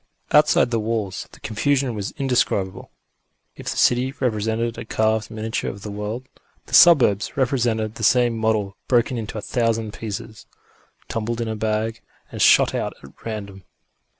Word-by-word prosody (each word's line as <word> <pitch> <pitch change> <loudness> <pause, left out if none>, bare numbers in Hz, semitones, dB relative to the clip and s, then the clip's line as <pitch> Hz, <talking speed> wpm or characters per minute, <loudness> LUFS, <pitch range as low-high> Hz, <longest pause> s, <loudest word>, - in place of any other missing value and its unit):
Outside 150 -4 +4
the 115 - +1
walls 110 -3 -3
the - - -16
confusion 135 +3 0
was 100 -2 -4
indescribable. 120 -8 0 0.7
If - - -6
the - - -4
city 130 +3 +2
represented 115 -1 -1
a - - -5
carved 110 0 0
miniature 110 0 -3
of 100 +1 -9
the 105 - -6
world, 105 +5 -5 0.4
the - - -15
suburbs 125 - +5
represented 120 -5 0
the 115 - -8
same 120 +1 +4
model 110 -3 0
broken 120 0 +2
into 110 0 -6
a - - -4
thousand 115 -3 -1
pieces, 110 0 -7 0.6
tumbled 115 +1 -3
in 115 - -2
a 110 - -3
bag 110 +1 -2 0.3
and - - -5
shot - - +6
out - - -2
at 70 - -12
random. 100 -3 -6
110 Hz, 155 wpm, -22 LUFS, 105-120 Hz, 0.7 s, shot